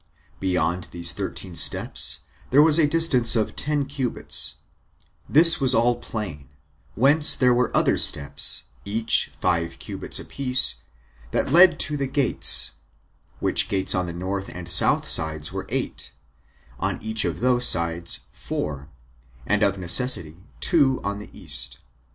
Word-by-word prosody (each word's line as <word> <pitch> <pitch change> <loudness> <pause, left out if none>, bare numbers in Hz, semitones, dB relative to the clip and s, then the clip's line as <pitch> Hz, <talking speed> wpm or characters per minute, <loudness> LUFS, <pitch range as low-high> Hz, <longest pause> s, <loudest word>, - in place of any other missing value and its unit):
Beyond 90 -1 -3
these 85 -1 0
thirteen 95 -1 -7
steps - - +1 0.3
there 140 +3 +4
was 155 0 +4
the 160 -3 +2
distance 145 -8 +4
of 110 -2 -2
ten 145 -1 -3
cubits; 135 -3 -1 0.7
this 165 +3 +5
was 130 -1 +3
all 120 +2 +1
plain; 80 - -8 0.5
whence 145 +7 +3
there 125 -1 +1
were 125 +1 -1
other - - 0
steps, 70 0 0 0.2
each 110 +2 0
of - - -25
five 85 -2 -3
cubits - - -2
a - - -7
piece, 130 -1 0 0.5
that - - -3
led 175 0 +4
to 150 0 -2
the 140 -1 -4
gates, 135 -2 +6 0.7
which - - +1
gates 95 -3 0
on 90 -2 -3
the - - -6
north 95 +3 -6
and 90 -1 -10
south 85 0 +2
sides 80 -1 0
were - - -7
eight, - - -5 0.7
on - - -4
each 110 0 -2
of - - -5
those 125 0 +3
sides 85 0 -1
four, 75 -1 -7 0.6
and 105 0 -1
of 100 -2 0
necessity 85 -3 -1 0.2
two 140 -7 +2
on 100 0 -5
the 105 - -12
east. - - +2
110 Hz, 145 wpm, -21 LUFS, 85-135 Hz, 0.7 s, gates